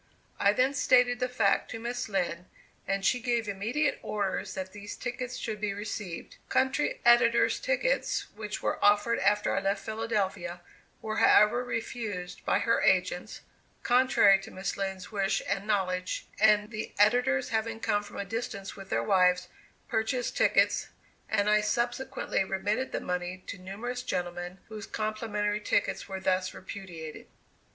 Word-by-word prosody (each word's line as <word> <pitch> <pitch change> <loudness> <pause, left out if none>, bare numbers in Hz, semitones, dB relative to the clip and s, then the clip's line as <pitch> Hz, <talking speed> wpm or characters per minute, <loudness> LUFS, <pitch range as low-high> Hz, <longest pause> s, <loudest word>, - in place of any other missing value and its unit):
I 200 - +5
then 255 +6 +2
stated 250 -3 +4
the 250 0 0
fact 220 -5 +2
to 225 - -5
Miss 240 0 -3
Lind, 180 -3 -1 0.4
and 195 0 -1
she 250 - +3
gave 235 -2 0
immediate 225 +10 0
orders 200 -2 -2
that 185 0 -5
these 205 0 -7
tickets 250 0 -4
should 215 -2 -4
be 205 -2 -1
received. 205 -4 -6
Country 265 +3 +1
editors' 240 0 +5
tickets, - - 0
which 210 0 -6
were - - -1
offered 205 +3 +4
after 205 +2 +2
I - - +2
left 195 +1 -1
Philadelphia, 200 -6 -2 0.4
were 215 0 -3
however 235 +4 +5
refused 225 -6 -4
by - - +3
her 230 - +2
agents 185 0 +1 0.4
(contrary 245 -6 +5
to 195 - -10
Miss 190 -1 -4
Lind's 190 -1 -4
wish 195 -1 +1
and 200 +1 -2
knowledge), 185 -3 -1
and 210 0 +4
the 215 -1 -5
editors, 250 +5 +3
having 225 0 -1
come 205 -2 +1
from 205 - -11
a 200 - -3
distance 200 -2 -5
with 195 -1 -11
their - - 0
wives, 180 -2 +3 0.4
purchased 235 +3 -1
tickets, - - +3 0.4
and 205 -1 +1
I 210 0 +4
subsequently 240 +2 -1
remitted 205 +7 -1
the - - -2
money 180 +1 -3
to 200 - -7
numerous 220 +7 -5
gentlemen, 175 -4 -4
whose 215 -2 -8
complimentary 215 -1 -2
tickets - - 0
were 190 0 -4
thus 185 0 0
repudiated. 175 -5 -8
210 Hz, 150 wpm, -29 LUFS, 195-235 Hz, 0.4 s, I